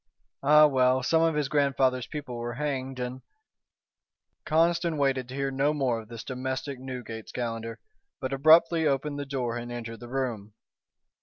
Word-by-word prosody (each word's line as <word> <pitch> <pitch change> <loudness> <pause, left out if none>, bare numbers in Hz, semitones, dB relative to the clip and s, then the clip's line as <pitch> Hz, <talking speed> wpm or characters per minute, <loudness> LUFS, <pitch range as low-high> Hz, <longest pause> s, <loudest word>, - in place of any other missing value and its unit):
Ah, 150 +2 +7
well, 130 -2 +3
some 160 +5 +3
of 165 -1 +2
his 150 -2 0
grandfather's 135 -3 +1
people 145 -5 -6
were 120 0 -4
hanged 135 -2 -3
and 125 +1 -4 0.6
" - - -58
Conniston 165 +1 +2
waited 135 -3 +1
to 130 - -8
hear 135 0 -1
no 140 +3 +1
more 130 -5 0
of 110 - -15
this 115 0 -8
domestic 130 +1 -4
Newgate's 125 -4 -7
Calendar, 115 -2 -4 0.4
but 130 +1 -3
abruptly 160 +3 +5
opened 145 +1 -1
the 140 - -5
door 125 -4 -2
and 120 0 -6
entered 115 -1 -6
the 120 - -10
room. 115 -6 -3
130 Hz, 165 wpm, -27 LUFS, 120-145 Hz, 0.6 s, Ah